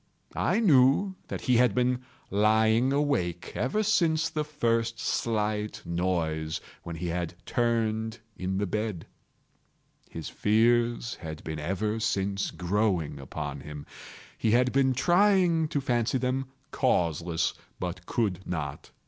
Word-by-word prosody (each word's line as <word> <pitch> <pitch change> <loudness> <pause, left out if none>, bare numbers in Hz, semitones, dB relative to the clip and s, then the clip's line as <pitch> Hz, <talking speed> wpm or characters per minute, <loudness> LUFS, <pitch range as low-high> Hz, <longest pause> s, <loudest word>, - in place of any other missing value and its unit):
I - - +1
knew 155 - +4
that - - -5
he 125 -2 +3
had 125 -4 +4
been 125 0 +1 0.3
lying 110 +4 +3
awake 140 - 0
ever 210 - 0
since 165 -6 +2
the 155 - -1
first 115 -6 0
slight 105 -2 -1
noise, 80 -3 -1 0.2
when 85 - -6
he 85 +1 -3
had 85 0 -3
turned 115 -1 0 0.2
in 95 +1 -2
the 100 - 0
bed. 105 -3 -3 1.0
His 80 -2 -6
fears 115 +2 +2
had 80 -1 -7
been 80 -1 -4
ever 105 +7 -1
since 100 -3 0
growing 90 -6 0
upon 70 +1 -5
him. 75 +1 -8 0.5
He 110 - +1
had 125 +3 +4
been 135 -1 +3
trying 175 +1 +4
to 150 -2 -1
fancy 125 -2 +1
them 130 +1 -1 0.2
causeless, 85 0 +1 0.3
but 90 0 -5
could 100 -6 0
not. 75 -6 -4
110 Hz, 130 wpm, -28 LUFS, 90-125 Hz, 1.0 s, knew